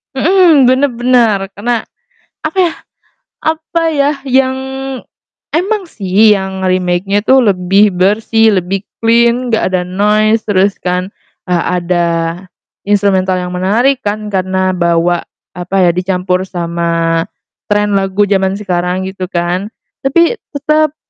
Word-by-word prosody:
Mhm, 315 -3 +4
bener 265 +2 +2
bener. 235 -4 +2 0.2
Karena 235 +2 -1 0.6
apa 315 +4 -4
ya 345 - +1 0.7
apa 320 +1 -1
ya, 285 -1 +2
yang 260 0 +1 1.0
emang 390 +5 0
sih 210 - +2
yang 190 -1 -2
remake-nya 185 +2 0
itu 260 +5 +3
lebih 195 +1 +3
bersih, 210 +3 +2
lebih 185 +2 -2 0.2
clean 235 +2 +2
gak 220 - +1
ada 180 -1 0
noise, 210 +4 +1
terus 200 0 +1
kan, 180 +2 -2 0.3
eee, 175 -2 0 0.2
ada 175 0 0 0.8
instrumental 190 -2 +2
yang 180 0 -4
menarik 225 +9 +1
kan, 210 0 -4
karena 185 0 0
bawa 170 -1 +1 0.3
apa 180 +2 -5
ya, - - +4
dicampur 180 0 -1
sama 170 -2 -1 0.5
trend 205 0 +1
lagu 195 +1 +1
jaman 195 -1 0
sekarang 180 -2 -2
gitu 190 -1 -5
kan. 180 +2 -2 0.3
Tapi 340 - +2 0.2
tetep 305 +1 +1
200 Hz, 120 wpm, -13 LUFS, 180-240 Hz, 1.0 s, Mhm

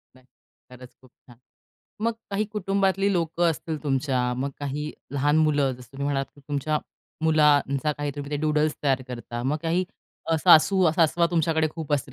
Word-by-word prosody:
नाही, 130 0 -21 0.4
खरंच 125 0 -13
खूप 130 - -19 0.2
छान. 120 -2 -16 0.7
मग 230 0 +1 0.2
काही 200 +2 0
कुटुंबातली 195 -1 +1
लोकं 170 -1 +1
असतील 160 -1 -5
तुमच्या, 135 -3 0
मग 135 +3 -2
काही 145 +2 -4 0.2
लहान 145 +2 +2
मुलं, 145 -3 +2
जसं 125 0 -13
तुम्ही 140 +1 -4
म्हणालात 140 -1 -1
की 145 - -18
तुमच्या 150 +1 0 0.5
मुलांचा 150 -2 +3
काही 145 0 -3
तुम्ही 145 0 -6
ते 150 - -1
डूडल्स 150 0 +1
तयार 135 -2 +1
करता. 120 -1 -6
मग 135 +4 0
काही 170 +3 +1 0.5
अ, 165 - +3
सासू-सासवा 170 0 +4
तुमच्याकडे 160 -2 +1
खूप 155 -2 -6
असतील, 140 -2 -1
150 Hz, 165 wpm, -25 LUFS, 135-165 Hz, 0.7 s, सासू-सासवा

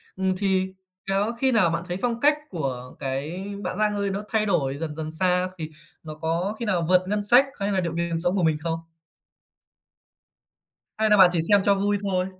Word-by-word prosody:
Ừm, 190 0 0
thì 190 -1 0 0.4
có 200 +4 +1
khi 265 -1 +2
nào 215 -8 +4
bạn 165 +1 -2
thấy 175 - -3
phong 235 -1 -1
cách 295 +2 +4
của 130 -7 -4
cái 145 +8 -4 0.2
bạn 180 - -3
Giang 210 -1 +1
Ơi 200 -1 -1
nó 200 +2 -3
thay 215 -1 +1
đổi 140 -8 0
dần 155 -1 -5
dần 155 -1 -5
xa 180 +2 +1
thì 155 -1 -5 0.3
nó 155 -1 -8
có 170 +6 -2
khi 235 - -3
nào 175 -5 0
vượt 185 0 +5
ngân 205 0 -1
sách 245 +6 +6
hay 200 +1 -1
là 190 - +1
điều 170 -1 -3
kiện 170 -1 -1
sống 175 +3 0
của 185 - +1
mình 160 -2 +2
không? 165 0 -2 2.2
Hay 220 0 +3
là 210 - +6
bạn 185 -2 +8
chỉ 170 - +1
xem 205 -1 +6
cho 200 - +4
vui 205 +1 +1
thôi? 185 -2 0
185 Hz, 215 wpm, -24 LUFS, 165-205 Hz, 2.2 s, bạn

